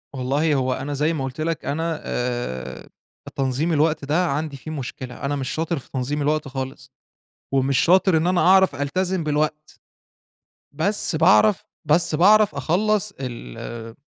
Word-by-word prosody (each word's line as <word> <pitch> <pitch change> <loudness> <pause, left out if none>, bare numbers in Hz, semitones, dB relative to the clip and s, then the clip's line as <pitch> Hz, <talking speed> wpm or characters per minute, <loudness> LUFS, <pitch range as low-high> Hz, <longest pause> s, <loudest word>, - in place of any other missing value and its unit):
والله 140 +5 0
هو 130 -1 0
أنا 135 +3 -4
زي 150 +4 +1
ما 140 -4 -3
قُلت 135 +3 -5
لك 165 0 -2
أنا 160 +2 -2
آآ 65 - -4 0.5
تنظيم 135 +5 0
الوقت 155 -1 +1
ده 160 +6 +1
عندي 145 -1 -3
فيه 155 +4 -8
مشكلة، 130 -3 -6
أنا 145 +1 -1
مش 135 -2 -3
شاطر 160 0 -2
في - - -16
تنظيم 140 +3 -2
الوقت 150 0 0
خالص، 130 0 -6 0.6
ومش 135 0 +2
شاطر 185 0 +4
إن 160 +2 +1
أنا 180 -1 +2
أعرف 190 +1 +5
ألتزم 180 +5 -1
بالوقت. 150 0 -2 1.0
بس 185 +3 0
باعرف 190 +5 +4 0.2
بس 165 +1 +3
باعرف 210 +5 +5
أخلص 210 +4 0
ال 115 - -7
150 Hz, 150 wpm, -22 LUFS, 135-170 Hz, 1.0 s, أعرف